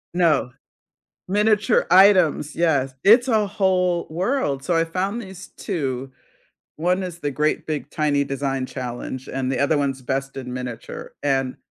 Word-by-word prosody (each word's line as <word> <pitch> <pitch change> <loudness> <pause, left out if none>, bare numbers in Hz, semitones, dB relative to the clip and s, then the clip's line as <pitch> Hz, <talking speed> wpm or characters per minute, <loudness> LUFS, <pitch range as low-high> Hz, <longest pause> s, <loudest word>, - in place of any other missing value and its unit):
No. 155 -8 +2 0.7
Miniature 210 +1 +2
items, 185 -5 +5
yes; 140 -6 +1
it's 240 +5 +6
a 215 -3 +2
whole 180 -3 +1
world. 170 - -1
So, 175 - +1
I 165 - +3
found 190 +7 -2
these 190 -1 -10
2, 135 -8 -3 0.7
1 180 +4 +1
is 175 -2 -6
the 145 - -2
Great 150 +3 -1
Big 155 -2 -4
Tiny 145 -2 +1
Design 135 -1 -2
Challenge, 130 0 -6
and 130 0 -2
the - - -1
other 145 +2 +2
one's 135 -2 -1
Best 135 +1 -3
in 125 -2 -6
Miniature. 125 -2 -7
And 135 -2 0
150 Hz, 150 wpm, -22 LUFS, 135-185 Hz, 0.7 s, it's